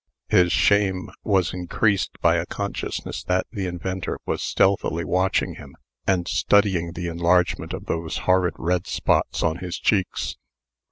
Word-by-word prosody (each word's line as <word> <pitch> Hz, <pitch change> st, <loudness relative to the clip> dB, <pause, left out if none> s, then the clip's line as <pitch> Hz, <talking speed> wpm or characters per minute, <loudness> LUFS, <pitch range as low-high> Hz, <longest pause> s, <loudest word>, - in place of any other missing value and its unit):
His 90 Hz, -1 st, +4 dB
shame 100 Hz, -3 st, +2 dB
was 95 Hz, -5 st, +1 dB
increased 95 Hz, +3 st, 0 dB
by -, -, +4 dB
a -, -, -2 dB
consciousness -, -, -4 dB
that 90 Hz, 0 st, +1 dB
the 100 Hz, -5 st, -3 dB
inventor 90 Hz, +1 st, -4 dB
was -, -, -2 dB
stealthily 85 Hz, -4 st, +1 dB
watching 95 Hz, +5 st, +1 dB
him, -, -, -12 dB, 0.3 s
and 90 Hz, -2 st, +1 dB
studying 95 Hz, -6 st, +2 dB
the 85 Hz, 0 st, -5 dB
enlargement 85 Hz, 0 st, +1 dB
of 95 Hz, -, -6 dB
those 80 Hz, -1 st, -3 dB
horrid 90 Hz, -1 st, +3 dB
red 90 Hz, +1 st, -1 dB
spots -, -, 0 dB
on 80 Hz, 0 st, +1 dB
his 90 Hz, -1 st, -5 dB
cheeks. 95 Hz, -5 st, 0 dB
90 Hz, 145 wpm, -23 LUFS, 85-95 Hz, 0.3 s, His